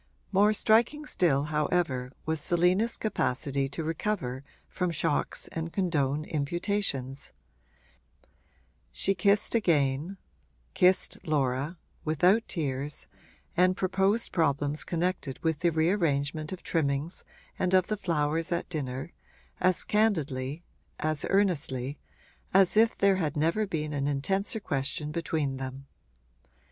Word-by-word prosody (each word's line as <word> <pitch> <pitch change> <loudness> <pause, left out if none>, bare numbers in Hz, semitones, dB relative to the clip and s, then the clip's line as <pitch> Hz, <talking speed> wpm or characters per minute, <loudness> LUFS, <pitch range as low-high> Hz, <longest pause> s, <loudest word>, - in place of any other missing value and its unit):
More 205 +2 +5
striking 230 +8 +2
still 145 - +2
however 150 -4 0
was 160 -1 -1
Selina's 180 +8 +2
capacity 140 - -1
to 160 - -4
recover 155 -5 -2 0.2
from 180 -1 -2
shocks 155 -3 -1
and 165 0 -4
condone 155 -6 0
imputations; 145 - -2 1.6
she 195 - 0
kissed 200 +2 +2
again 160 - +1 0.6
kissed 180 +1 +3
Laura 145 +2 0 0.3
without 180 +8 +3
tears, 145 -3 -3 0.5
and 185 +1 +3
proposed 195 +4 +1
problems 145 -2 +1
connected 170 -5 -2
with 160 -3 0
the 170 -1 +2
rearrangement 160 -3 0
of 185 - -7
trimmings 150 +1 -1 0.4
and 185 0 +2
of 185 -1 +4
the 215 - -1
flowers 165 -3 -1
at 170 0 -1
dinner, 135 -2 -4 0.5
as 180 -1 +3
candidly 155 -9 0 0.4
as 155 -1 +1
earnestly 145 -9 0 0.6
as 195 0 +5
if 225 +1 +4
there 195 -1 +4
had 155 -5 -1
never 165 +8 +1
been 155 -4 -3
an 140 -1 -1
intenser 195 +10 0
question 145 -3 -2
between 155 -4 -2
them. 135 +1 -6
160 Hz, 115 wpm, -28 LUFS, 140-185 Hz, 1.6 s, More